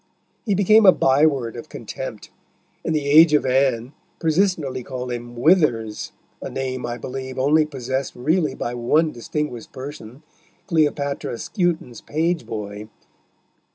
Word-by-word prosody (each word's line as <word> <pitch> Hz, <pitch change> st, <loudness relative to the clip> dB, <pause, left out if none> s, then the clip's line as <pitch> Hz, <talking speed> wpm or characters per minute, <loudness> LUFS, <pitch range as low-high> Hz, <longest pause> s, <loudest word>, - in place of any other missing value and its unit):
He 205 Hz, -, +2 dB
became 210 Hz, +2 st, +5 dB
a -, -, +11 dB
byword 135 Hz, -6 st, +2 dB
of 120 Hz, -, -9 dB
contempt, -, -, -7 dB, 0.5 s
and 160 Hz, -, -1 dB
the 150 Hz, -2 st, -1 dB
Age 155 Hz, +2 st, +7 dB
of 145 Hz, -, +2 dB
Anne 130 Hz, -1 st, +1 dB, 0.2 s
persistently 160 Hz, -5 st, 0 dB
called 125 Hz, 0 st, -5 dB
him 120 Hz, 0 st, -6 dB
Withers, 120 Hz, -, +2 dB, 0.3 s
a -, -, -5 dB
name, 130 Hz, -2 st, -3 dB
I 120 Hz, 0 st, -4 dB
believe, 130 Hz, 0 st, -6 dB
only 150 Hz, +4 st, +3 dB
possessed 130 Hz, -1 st, -3 dB
really 150 Hz, +2 st, 0 dB
by 120 Hz, -, -3 dB
one 150 Hz, +7 st, +2 dB
distinguished 125 Hz, 0 st, -4 dB
person, 135 Hz, -1 st, -9 dB, 0.4 s
Cleopatra 145 Hz, -6 st, 0 dB
Skewton's 170 Hz, -, -2 dB
page 165 Hz, +2 st, -1 dB
boy. 105 Hz, -1 st, -6 dB
135 Hz, 130 wpm, -22 LUFS, 120-155 Hz, 0.5 s, a